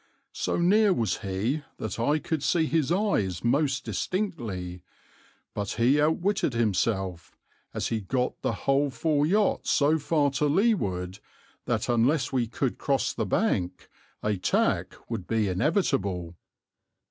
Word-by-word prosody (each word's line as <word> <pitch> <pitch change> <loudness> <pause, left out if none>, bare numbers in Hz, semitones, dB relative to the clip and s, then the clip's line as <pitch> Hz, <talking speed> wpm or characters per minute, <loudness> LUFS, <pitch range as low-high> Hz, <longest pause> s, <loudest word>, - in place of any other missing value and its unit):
So - - -1
near 200 +4 +4
was 115 - 0
he 105 +10 -2 0.2
that 110 - -5
I 145 +7 +2
could 155 0 -3
see 160 +2 +2
his 155 -2 0
eyes 170 - 0
most 135 +2 +1
distinctly, 110 - -3 0.7
but 100 -1 -3
he 130 +5 +3
outwitted 160 0 +1
himself, 95 -5 -1 0.3
as - - -2
he 110 -1 -1
got 125 +6 -2
the - - 0
whole 140 +1 +3
four 150 +1 +1
yachts 205 +4 +1
so 155 +2 +3
far 145 -1 +1
to 140 +2 0
leeward 100 - 0 0.5
that - - -1
unless 130 +5 +2
we 125 -3 +1
could 115 - -2
cross - - 0
the - - -2
bank 90 -1 0 0.4
a 105 -1 0
tack 90 - 0
would 110 -7 -5
be 110 -2 +1
inevitable. 95 - 0
130 Hz, 135 wpm, -27 LUFS, 100-155 Hz, 0.7 s, near